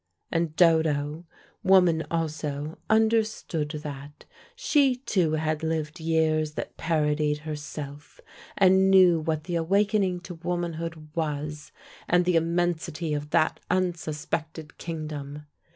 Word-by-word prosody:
And 165 -2 -1
Dodo, 160 -1 +2 0.3
woman 180 -4 +4
also, 155 -2 -3
understood 220 -8 +1
that: 145 0 -8 0.3
she 290 - +3
too 190 - 0
had 155 0 -1
lived 160 +1 -2
years 160 -1 +1
that - - -6
parodied 150 -2 0
herself, 145 -1 -7 0.4
and 190 0 +5
knew 185 -3 +6
what 155 -1 -2
the 175 0 -2
awakening 195 +1 +1
to 180 0 -8
womanhood 165 -2 -4
was, 150 -2 -3 0.4
and 180 0 +3
the 180 -1 +2
immensity 165 -1 0
of 145 0 -3
that 155 - +2
unsuspected 160 -3 -3
kingdom. 150 -3 -6
160 Hz, 110 wpm, -26 LUFS, 150-175 Hz, 0.4 s, knew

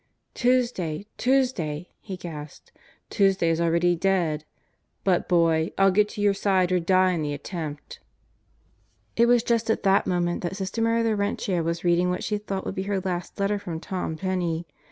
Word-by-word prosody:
"Tuesday, 235 -9 0
Tuesday," 225 - 0
he 190 -3 -7
gasped. 150 -4 -9 0.4
"Tuesday 195 -5 +3
is 165 +1 0
already 170 +1 +2
dead! 170 -4 0 0.6
But, 185 -3 +1
boy, 165 -2 +2
I'll 195 0 +5
get 210 +2 +3
to 210 - -6
your 205 -1 +4
side 190 -2 +1
or 180 - +3
die 185 +2 +3
in 170 -3 -1
the 145 -1 -2
attempt!" 150 -1 -7 1.2
It 235 +1 +4
was 240 -1 +4
just 235 -1 0
at 225 - +1
that 195 0 +3
moment 175 -1 0
that 175 +1 -3
Sister 195 +3 -3
Mary 230 0 +2
Laurentia 200 -4 0
was 170 +1 -2
reading 175 +1 +3
what 180 - -2
she 210 -1 -1
thought 200 -2 -4
would - - -3
be 190 - -3
her 200 -1 +1
last 180 +1 -4
letter 200 +1 +1
from 170 -5 -5
Tom 180 -2 -4
Penney. 175 -2 -2
185 Hz, 175 wpm, -25 LUFS, 170-205 Hz, 1.2 s, I'll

